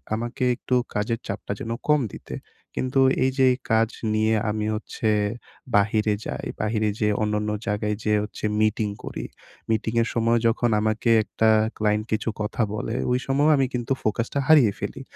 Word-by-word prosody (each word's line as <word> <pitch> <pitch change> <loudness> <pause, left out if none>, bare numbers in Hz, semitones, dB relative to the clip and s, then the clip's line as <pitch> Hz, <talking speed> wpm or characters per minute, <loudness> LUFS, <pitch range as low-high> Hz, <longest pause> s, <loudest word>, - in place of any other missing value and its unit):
আমাকে 120 +2 -4
একটু 125 - -2 0.2
কাজের 115 +2 -1
চাপটা 100 0 -5
যেন 115 - -5 0.2
কম 150 -2 +5
দিতে। - - -8 0.4
কিন্তু 130 +1 0 0.3
এইযে 130 0 +3 0.2
কাজ 110 0 +3 0.2
নিয়ে 110 +1 +2 0.2
আমি 105 0 -1
হচ্ছে 110 0 -4 0.7
বাহিরে 105 +1 +3
যাই, - - -4 0.2
বাহিরে 110 0 0
যেইয়ে 105 -1 +2
অন্যান্য 105 0 -1 0.2
জায়গায় 105 0 0
যেয়ে 105 -1 +2
হচ্ছে 105 0 -6 0.2
মিটিং 110 0 +1
করি। - - -5 0.4
মিটিংয়ের 115 +1 +1
সময় 115 0 +2
যখন 115 +1 +1
আমাকে 110 +2 0
একটা 110 +1 +1 0.3
ক্লায়েন্ট 105 0 +1
কিছু 110 +1 0
কথা 105 +3 -2
বলে, 120 - -3 0.2
ওই 125 - +2
সময়ও 140 +3 +3
আমি 135 - +3
কিন্তু 125 +1 -1
ফোকাসটা 115 +6 -1
হারিয়ে 140 -10 +6
ফেলি। - - -5
110 Hz, 155 wpm, -24 LUFS, 105-120 Hz, 0.7 s, হারিয়ে